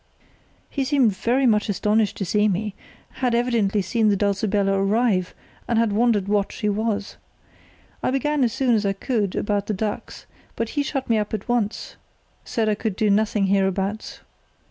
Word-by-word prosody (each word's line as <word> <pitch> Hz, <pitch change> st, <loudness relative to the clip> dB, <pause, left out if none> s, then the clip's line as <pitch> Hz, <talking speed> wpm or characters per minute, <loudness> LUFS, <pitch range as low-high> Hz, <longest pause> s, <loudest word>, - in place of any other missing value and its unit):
"He 275 Hz, -, -2 dB
seemed 260 Hz, -7 st, +2 dB
very 250 Hz, +7 st, +1 dB
much 210 Hz, -3 st, +2 dB
astonished 210 Hz, +1 st, +1 dB
to 195 Hz, -, -2 dB
see 210 Hz, +4 st, +2 dB
me; 210 Hz, +1 st, -1 dB, 0.5 s
had 250 Hz, -2 st, +1 dB
evidently 225 Hz, -5 st, +1 dB
seen 220 Hz, +4 st, +1 dB
the 205 Hz, -, +3 dB
Dulcibella 200 Hz, 0 st, +1 dB
arrive, 195 Hz, -1 st, +1 dB, 0.3 s
and 235 Hz, -, +1 dB
had 230 Hz, -2 st, +2 dB
wondered 215 Hz, -3 st, +2 dB
what 205 Hz, -1 st, +1 dB
she 210 Hz, -, -3 dB
was. 210 Hz, 0 st, -2 dB, 0.8 s
I -, -, 0 dB
began 275 Hz, +2 st, +1 dB
as 235 Hz, -, +2 dB
soon 250 Hz, +1 st, +1 dB
as 215 Hz, -2 st, +2 dB
I 200 Hz, -1 st, +1 dB
could 205 Hz, -2 st, -1 dB
about 205 Hz, -1 st, -1 dB
the 215 Hz, -, -1 dB
ducks, 210 Hz, +2 st, -4 dB, 0.3 s
but 230 Hz, -1 st, -2 dB
he 290 Hz, -, -1 dB
shut 275 Hz, -2 st, -3 dB
me 225 Hz, -2 st, +2 dB
up 210 Hz, +1 st, -2 dB
at 210 Hz, -, -7 dB
once, 235 Hz, -3 st, -2 dB, 0.5 s
said 225 Hz, -2 st, -1 dB
I 215 Hz, -, +3 dB
could 210 Hz, -1 st, -3 dB
do 215 Hz, -1 st, +2 dB
nothing 210 Hz, 0 st, +2 dB
hereabouts. 195 Hz, +1 st, -1 dB
215 Hz, 175 wpm, -23 LUFS, 200-235 Hz, 0.8 s, the